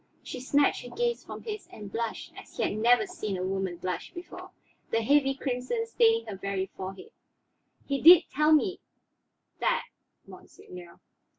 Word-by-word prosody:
She - - -7
snatched 280 +3 +2
her 245 - -9
gaze 475 0 -1
from - - -9
his 425 -2 -6
and 205 -2 -10
blushed 230 +1 -4
as - - -13
he - - 0
had - - 0
never 240 - +4
seen 270 - -4
a 180 - -3
woman 190 -2 -2
blush 180 +1 -4
before, 365 +1 -9 0.4
the 225 - 0
heavy 270 +2 +3
crimson 260 - -2
staining 455 0 +3
her 200 - -6
very 195 -1 -3
forehead. 195 - -8 0.7
"He 275 -1 -2
did 345 +2 +9
tell 300 +2 +3
me 365 +5 +3 0.8
that, - - +1 0.4
monseigneur." 175 -1 -13
270 Hz, 160 wpm, -28 LUFS, -, 0.8 s, did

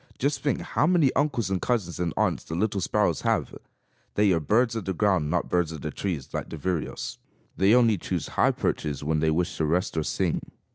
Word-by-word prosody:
Just 140 +3 0
think 145 - 0
how 150 - +1
many 165 -7 +4
uncles 130 -8 0
and 95 - 0
cousins 100 -10 -1
and 85 -2 0
aunts - - +1
the 80 - -6
little 100 +1 0
sparrows - - +1
have! - - 0 0.6
They 105 -1 +4
are 85 - +3
birds 115 - +2
of 110 - -3
the 95 - -2
ground, 95 -6 +2
not 85 +1 0
birds 90 -2 +1
of 80 - -7
the 75 - -4
trees, 85 -9 -4
like - - -3
the 80 - -6
vireos. 85 +1 -3 0.4
They 100 +4 +4
only 115 -5 +4
choose - - -3
high - - +3
perches 75 -2 -2
when 80 +1 +1
they 80 +1 +2
wish 85 +3 0
to 80 - +1
rest 90 +5 0
or 80 - +1
sing. - - -1
90 Hz, 220 wpm, -26 LUFS, 80-115 Hz, 0.6 s, many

